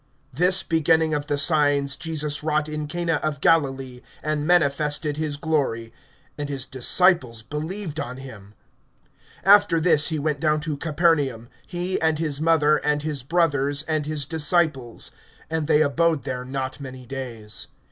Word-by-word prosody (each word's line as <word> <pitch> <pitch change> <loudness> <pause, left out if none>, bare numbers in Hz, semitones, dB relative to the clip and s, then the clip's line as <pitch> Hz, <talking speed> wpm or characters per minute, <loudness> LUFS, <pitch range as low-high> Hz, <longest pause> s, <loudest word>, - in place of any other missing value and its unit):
(11)This 180 +5 +1
beginning 160 0 +2
of 145 0 -2
the 145 -2 0
signs 145 -3 +2
Jesus 150 -1 -3
wrought 155 0 0
in 150 -1 -4
Cana 170 0 -1
of 150 -2 -2
Galilee, 135 -5 +1 0.2
and 150 -1 -1
manifested 150 -2 +1
his 155 -2 -2
glory; 140 -8 -1 0.5
and 145 -1 -3
his 135 -2 -3
disciples 130 -3 +2
believed 160 - -5
on 125 -2 -5
him. 110 -6 -11 0.9
(12)After 200 -3 +6
this 160 -3 +4
he 160 - -1
went 150 0 -1
down 155 0 +2
to 150 -1 -3
Capernaum, 145 -6 0 0.2
he, 180 0 -3
and 160 -1 +2
his 150 -2 -2
mother, 155 -2 +4
and 150 0 -1
his 150 -3 -2
brothers, 145 -2 +1
and 155 -2 -2
his 150 -2 -2
disciples; 150 -5 0 0.4
and 160 -2 -1
they 155 -1 +4
abode 160 +1 +1
there 125 -1 -4
not 130 0 -4
many 130 -2 -9
days. 120 -5 -5
150 Hz, 150 wpm, -23 LUFS, 140-160 Hz, 0.9 s, 12)After